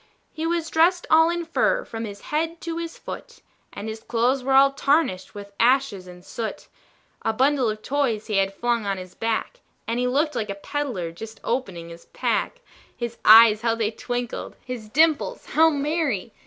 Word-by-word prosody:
He 320 +1 -3
was 335 -1 -1
dressed 350 +3 +3
all 320 +1 +6
in 345 0 -2
fur 420 +9 +1
from 225 0 -5
his 200 -1 -8
head 325 +2 -2
to 335 -1 -4
his 335 -1 -6
foot, 470 -2 -9 0.3
And 210 - -7
his 220 0 -5
clothes 245 +4 0
were 265 +1 0
all 275 +1 +7
tarnished 275 - 0
with 200 0 -9
ashes 240 -6 +2
and 180 0 -13
soot; 225 -2 -6 0.5
A - - 0
bundle 265 0 +2
of 215 0 -5
toys 255 -7 0
he 210 -3 -1
had 195 0 +2
flung 235 +1 -1
on 195 -1 -1
his 185 -1 -9
back, 225 - -2 0.3
And 230 +2 -1
he 250 - +1
looked 295 +4 +1
like 215 - -3
a 200 - -3
peddler 210 - -4
just 220 +6 -10
opening 195 -9 -3
his 170 0 -12
pack; - - -2 0.4
His 235 -1 -5
eyes 220 -1 +8
how 230 -1 +1
they 225 -1 -1
twinkled! 245 +1 -5
his 240 -4 -7
dimples 315 - +2
how 320 +1 +6
merry! 285 - -1
245 Hz, 185 wpm, -24 LUFS, 215-305 Hz, 0.5 s, eyes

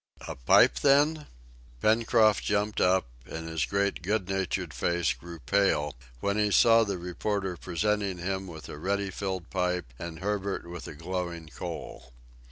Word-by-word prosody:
"A - - -5
pipe, - - +5
then?" 150 +2 +3 0.5
Pencroft 110 - +3
jumped 105 0 0
up, 95 +1 +3 0.2
and 80 0 -5
his 80 -2 -1
great 100 0 0
good 95 +1 -1
natured 95 -3 -2
face 85 -2 +1
grew 85 +8 -10
pale 80 -4 +1 0.3
when 100 +1 0
he 105 0 +3
saw 115 +3 +6
the 100 -3 -2
reporter 95 +2 -2
presenting 100 +2 -1
him 95 +2 -3
with 80 -5 -9
a 75 - -8
ready 100 +3 -1
filled 95 -2 -4
pipe, 90 -8 -1
and 85 -1 -6
Herbert 100 0 -2
with 85 0 -7
a - - -8
glowing 85 0 -4
coal. 65 -1 -7
95 Hz, 155 wpm, -28 LUFS, 85-100 Hz, 0.5 s, saw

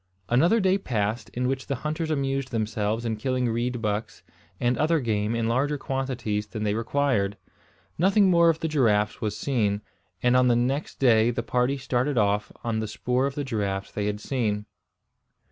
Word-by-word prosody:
Another 165 - +4
day 190 -1 +2
passed, 110 - -2
in 125 +1 -2
which 135 0 -2
the 140 - -1
hunters 155 +1 -2
amused 135 -3 -1
themselves 110 0 -1
in 110 -1 -1
killing 125 +2 0
reed 120 +1 -2
bucks 105 +1 -3 0.4
and 120 +1 +2
other 160 +3 +2
game 110 -3 0
in 115 -1 0
larger 140 +5 +1
quantities 125 -6 -2
than 110 0 -5
they 105 -1 +1
required. 115 -3 0 0.6
Nothing 195 +3 +4
more 170 -1 +5
of 165 -1 0
the 160 - 0
giraffes 115 -9 +1
was 105 -1 -2
seen; 105 -5 0 0.4
and 125 0 +4
on 125 0 +5
the 120 - +4
next 130 +5 -1
day 115 -3 +4
the 120 0 -2
party 125 +3 +1
started 130 +1 -1
off 105 -1 +1
on 115 -2 -1
the 110 - -2
spoor 125 +5 0
of 140 - -5
the 145 - -2
giraffes 100 -6 -2
they 105 -1 -2
had 105 0 -2
seen. 105 -4 -1
120 Hz, 180 wpm, -26 LUFS, 110-135 Hz, 0.6 s, more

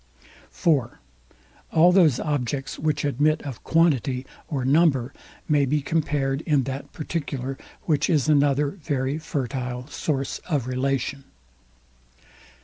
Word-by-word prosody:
(4) 140 -9 +1 0.7
All 170 +3 +6
those 165 -9 +5
objects, 140 -2 -2
which 150 -1 0
admit 150 +3 +2
of 135 -5 -7
QUANTITY, 135 -6 +2 0.2
or 135 -5 -2
NUMBER, 140 -3 +3 0.3
may 145 -2 +3
be 145 +3 +1
compared 145 -2 0
in 150 -4 +2
that 135 +2 -5
particular; 140 -5 -4 0.3
which 155 -4 +1
is 150 -5 +2
another 145 -1 +3
very 140 -4 -2
fertile 125 -4 -3
source 135 -3 -2
of 145 -7 0
relation. 135 +1 -2
140 Hz, 115 wpm, -24 LUFS, 130-155 Hz, 0.7 s, All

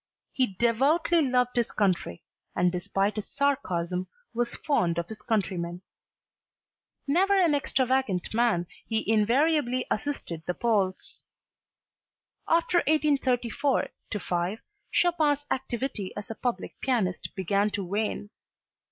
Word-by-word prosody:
He 260 -2 +2
devoutly 285 - +3
loved 250 -3 +1
his 240 -2 +1
country 180 - 0 0.3
and 175 0 +3
despite 195 +4 -1
his 215 - -3
sarcasm 185 -11 -1 0.3
was 240 0 -1
fond 180 - +1
of 170 0 -1
his 220 -1 -8
countrymen. 180 -5 -2 1.2
Never 385 +7 +3
an 340 -5 +4
extravagant 260 - 0
man, 220 -7 +2 0.2
he 220 -1 -1
invariably 250 +4 +2
assisted 215 - -3
the 180 - -1
Poles. 200 -5 -1 1.2
After 335 +1 +3
1834 280 -4 +1 0.3
5, 180 +4 -2 0.3
Chopin's 305 -5 +2
activity 250 -6 -2
as 205 +1 -6
a - - -5
public 245 +2 -3
pianist 220 -9 -1
began 200 +2 +1
to 200 -2 -3
wane. 205 +2 -2
230 Hz, 110 wpm, -27 LUFS, 190-280 Hz, 1.2 s, an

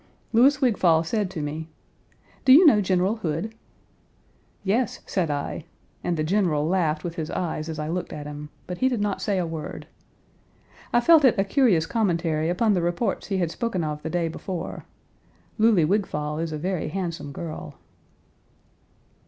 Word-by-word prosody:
Louis 265 +5 +5
Wigfall 185 - +3
said 205 +2 -1
to 160 -5 -5
me: 155 +2 -5 0.7
"Do 260 - +5
you 335 +7 +8
know 225 -9 +6
General 190 +3 +1
Hood?" 180 +3 -3 1.1
"Yes," 215 +4 0
said 180 -5 -1
I, 145 +2 -3 0.4
and 175 -2 -1
the 155 - 0
General 165 -4 +1
laughed 160 -4 +1
with 170 -1 -5
his 155 -2 -3
eyes 160 -2 -3
as 160 - -5
I 150 0 -3
looked 175 +3 -3
at 150 - -6
him; 150 0 -7 0.2
but 180 -1 -6
he 260 - +3
did 245 -4 -1
not 205 -1 -1
say 200 -2 0
a 180 - 0
word. 160 -2 -6 1.1
I 240 - +4
felt 320 +3 +6
it 255 -5 +5
a 195 - +3
curious 195 - +3
commentary 165 -7 0
upon 210 +5 +2
the 180 - +1
reports 175 +7 -1
he 195 - -1
had 175 -3 0
spoken 210 -6 -2
of 150 -1 -3
the 160 - -4
day 170 0 0
before. 175 +2 -6 0.7
Louly 215 -7 +5
Wigfall 150 -5 -1
is 165 -1 -2
a 155 - -3
very 180 +2 -2
handsome 170 -3 -4
girl. 155 -1 -7
175 Hz, 170 wpm, -25 LUFS, 155-210 Hz, 1.1 s, you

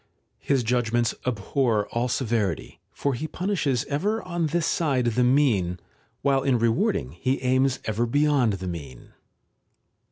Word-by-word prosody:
His 135 -3 +1
judgements 120 0 +1
abhor 115 -1 0
all 120 +1 -1
severity, 115 - -1
for 140 - -1
he 150 +6 -3
punishes 165 - -1
ever 205 +10 -1
on 170 -2 -1
this 165 +1 0
side 140 -8 +1
the 120 +1 +2
mean, 120 -10 +2 0.4
while 135 -1 +3
in 130 -2 +2
rewarding 115 - +1
he 130 - -1
aims 130 +1 +2
ever 110 +2 0
beyond 145 -3 +2
the 95 -1 -5
mean. 70 -8 -7
125 Hz, 135 wpm, -25 LUFS, 110-140 Hz, 0.4 s, while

